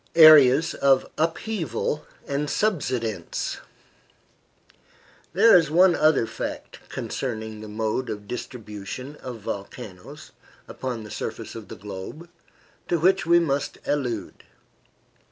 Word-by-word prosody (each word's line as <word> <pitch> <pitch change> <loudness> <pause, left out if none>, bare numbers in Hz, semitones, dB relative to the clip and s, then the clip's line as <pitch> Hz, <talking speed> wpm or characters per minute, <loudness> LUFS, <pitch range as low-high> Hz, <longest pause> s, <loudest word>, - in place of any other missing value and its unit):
AREAS 155 -2 +8
OF 135 -1 +3
UPHEAVAL 165 - -2 0.2
AND 140 +1 -1
SUBSIDENCE 125 - -1 1.7
There 220 +6 +7
is 165 -4 +5
one 180 +3 +5
other 155 -6 +3
fact - - -6
concerning 110 -4 -4
the 110 - -8
mode 110 +4 -2
of 105 -1 -6
distribution 120 +3 -7
of 120 -4 -8
volcanoes 105 +7 -8 0.4
upon 125 -4 -5
the 105 - -10
surface - - -5
of 115 -3 -9
the - - -8
globe, 105 - -8 0.6
to 170 - +1
which 190 +1 +3
we 170 0 +6
must 145 -4 0
allude. 125 -7 -2
130 Hz, 110 wpm, -25 LUFS, 110-160 Hz, 1.7 s, AREAS